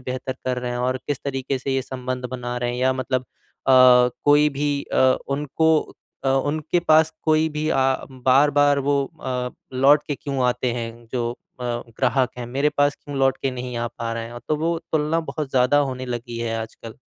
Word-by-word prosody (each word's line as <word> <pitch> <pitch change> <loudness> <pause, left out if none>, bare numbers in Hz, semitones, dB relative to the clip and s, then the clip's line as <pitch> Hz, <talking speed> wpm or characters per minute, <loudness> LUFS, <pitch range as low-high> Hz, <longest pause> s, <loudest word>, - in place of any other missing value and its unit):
बेहतर 130 +1 -4
कर 125 -1 -1
रहे 125 0 -4
हैं 120 - -3
और 125 +1 0
किस 145 -3 -1
तरीके 135 -1 -2
से 135 +1 -2
ये 135 - 0
संबंध 130 -1 -5
बना 125 -1 -4
रहे 120 0 -1
हैं 120 - -4
या 130 +1 +3
मतलब 130 0 -1
अ, - - -25 0.4
कोई 130 +3 +6
भी 145 0 -1
अ, 130 0 +4
उनको 150 +3 +2 0.5
अ, - - +2
उनके 145 +5 +1
पास 160 -1 +4
कोई 155 0 +3
भी 155 0 -3
आ 135 0 +3 0.2
बार-बार 140 +3 +3
वो 140 -1 +2 0.2
अ, 125 -1 -2 0.3
लौट 145 +3 +6
के 145 - -2
क्यों 135 -2 -3
आते 125 0 0
हैं, 115 0 -6
जो 120 -2 -1
अ, 170 -2 -16
ग्राहक 120 +2 0
हैं, 120 - -5
मेरे 140 +5 +1
पास 145 0 +3
क्यों 145 -1 -6
लौट 135 0 +3
के 135 - +1
नहीं 125 -1 -5
आ 120 - -1
पा 115 -1 -5
रहे 115 0 -4
हैं, 120 +1 -8
तो 155 - +2
वो 165 +2 0
तुलना 155 +1 +1
बहुत 150 -4 -4
ज़्यादा 130 +2 +3
होने 130 0 -6
लगी 120 -1 -5
है 115 -1 -2
आजकल। 110 0 -9
130 Hz, 200 wpm, -23 LUFS, 125-145 Hz, 0.5 s, कोई